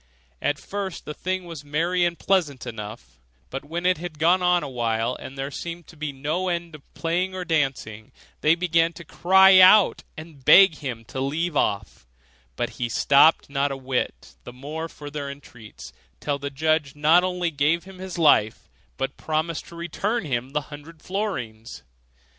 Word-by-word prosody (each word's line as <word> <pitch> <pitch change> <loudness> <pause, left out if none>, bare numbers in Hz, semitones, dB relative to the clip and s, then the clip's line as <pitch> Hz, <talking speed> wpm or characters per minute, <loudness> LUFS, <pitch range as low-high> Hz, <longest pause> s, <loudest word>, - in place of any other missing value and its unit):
At 145 - 0
first 195 +3 -6
the 150 - -5
thing 185 +3 -3
was 165 -4 -8
merry 170 +5 0
and 170 -1 -1
pleasant 155 -9 0
enough; 105 - -9 0.3
but 135 - -5
when 170 +4 -5
it 185 -3 +2
had 170 -3 -7
gone 175 +4 +3
on 180 -1 +3
a - - -4
while, 120 -1 -1
and 135 - -10
there 135 +1 -4
seemed 170 +2 -7
to 175 - -14
be 155 -1 -4
no 155 +7 -2
end 170 -1 -3
of 150 -2 -15
playing 180 +3 -1
or 185 -1 -4
dancing, 135 -9 -2 0.3
they 155 +2 +4
began 170 -1 +1
to 170 - -11
cry 190 +3 +6
out, 185 +2 +7 0.2
and 155 -3 -11
beg 190 +1 +7
him 120 -5 -6
to 130 +4 -6
leave 155 +4 -2
off; 100 - -2 0.5
but - - -2
he 120 - 0
stopped 140 +7 +4
not 140 0 -1
a 135 - -4
whit 130 -1 -3
the - - -9
more 150 +6 -6
for 145 -2 -10
their 145 -1 -5
entreaties, 110 - -12 0.3
till 140 - -2
the 140 0 -4
judge 150 0 0
not 155 +4 +4
only 180 -2 -1
gave 150 +3 +1
him 190 -1 -13
his 185 -1 -7
life, 115 -9 +3 0.3
but 135 +1 -3
promised 160 +1 -2
to 170 - -12
return 175 +6 -2
him 130 -3 -2
the 150 +2 -1
hundred 150 +3 -12
florins. 125 - -5
155 Hz, 180 wpm, -24 LUFS, 135-175 Hz, 0.5 s, out